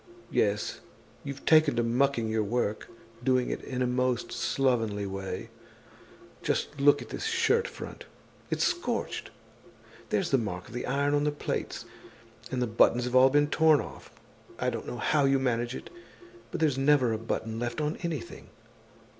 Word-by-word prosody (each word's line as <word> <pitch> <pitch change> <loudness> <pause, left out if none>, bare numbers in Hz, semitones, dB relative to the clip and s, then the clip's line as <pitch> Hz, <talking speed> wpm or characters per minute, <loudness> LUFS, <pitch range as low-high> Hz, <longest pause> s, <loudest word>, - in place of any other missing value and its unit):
Yes, 105 0 0 0.4
you've 140 -1 -7
taken 155 -2 +5
to 120 - +2
mucking 120 0 +1
your 110 0 0
work—doing 115 +3 -2
it - - -3
in 130 -1 -2
a - - +2
most 125 -1 0
slovenly 115 -7 0
way. 95 0 -5 0.9
Just 145 -1 -2
look 145 0 +5
at - - -14
this - - -5
shirt 460 +1 +2
front, - - -9 0.4
it's - - 0
scorched, 355 0 -1 0.8
there's 180 - 0
the 135 - +4
mark 95 -5 -4
of - - -12
the 125 - -4
iron 140 +2 +1
on 145 0 +2
the 150 - +2
plaits; 145 - -4 0.6
and 125 -1 -1
the - - +2
buttons 120 +2 +3
have 125 0 -3
all 130 +1 +7
been 145 +1 +3
torn 155 -1 +5
off. - - -8 0.5
I - - 0
don't - - -5
know 120 - -5
how 145 +3 +2
you 135 0 +4
manage 120 -1 0
it, - - -9 0.6
but - - -4
there's 150 -5 +2
never 135 -4 +4
a 110 - -2
button 115 0 -3
left 120 +4 -3
on 150 +1 -1
anything. 170 - -5
130 Hz, 165 wpm, -29 LUFS, 115-145 Hz, 0.9 s, all